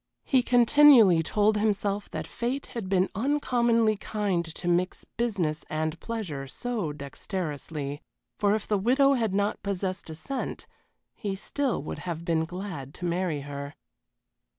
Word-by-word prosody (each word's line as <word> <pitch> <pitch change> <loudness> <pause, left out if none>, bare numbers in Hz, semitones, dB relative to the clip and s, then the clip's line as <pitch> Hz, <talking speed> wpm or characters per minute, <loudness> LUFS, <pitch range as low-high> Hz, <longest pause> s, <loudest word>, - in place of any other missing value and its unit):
He 260 -3 +3
continually 245 - +7
told 210 +5 +2
himself 205 -1 0
that 155 0 -4
fate 245 - -3
had 220 -6 -4
been 190 -1 +3
uncommonly 235 -3 +2
kind 200 -4 -1
to 175 - -5
mix 175 +1 0
business 190 -10 -2
and 155 +1 -2
pleasure 180 -13 -4
so 215 - -3
dexterously, 145 -1 -5 0.4
for 205 0 +3
if 215 - -4
the 210 -2 +1
widow 270 +6 +4
had 225 -7 0
not 205 +1 0
possessed 190 -2 -3
a 160 - -6
cent, 265 - -4 0.5
he 200 -3 -4
still 250 - -1
would - - -5
have 170 -2 -5
been 160 -1 +1
glad 175 -6 -6
to 180 - -5
marry 170 -3 -1
her. 140 +1 -7
195 Hz, 145 wpm, -27 LUFS, 160-230 Hz, 0.5 s, continually